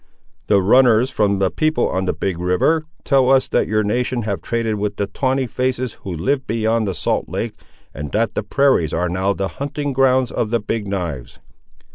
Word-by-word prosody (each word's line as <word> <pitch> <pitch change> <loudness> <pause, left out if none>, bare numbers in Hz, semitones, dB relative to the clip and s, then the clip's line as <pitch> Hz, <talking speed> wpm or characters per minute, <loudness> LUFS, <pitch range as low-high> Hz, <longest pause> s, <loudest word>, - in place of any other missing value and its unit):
"The 100 -2 +3
runners 125 +3 +4
from 100 -4 +1
the 95 -1 +1
people 155 0 +1
on 95 0 -1
the - - 0
Big 90 -3 -3
river, 90 - +2 0.2
tell 135 -2 +3
us 135 -1 +4
that - - +1
your 110 0 +1
nation 120 +3 -1
have 100 -2 -3
traded 115 -2 -1
with 105 0 -2
the 100 - -1
Tawney 130 +6 -1
faces 125 0 -2
who 95 - -6
live 130 - -1
beyond 110 -1 0
the 95 - -2
salt 75 - -1
lake, - - -3 0.4
and 75 0 -6
that 115 +2 0
the - - -1
prairies 105 - +2
are 90 +2 0
now 95 +3 0
the 95 0 -2
hunting 145 0 -3
grounds 130 -1 +3
of 110 - -1
the 115 +1 +1
Big 105 0 -3
knives!" 85 -10 -4
110 Hz, 195 wpm, -20 LUFS, 95-130 Hz, 0.4 s, runners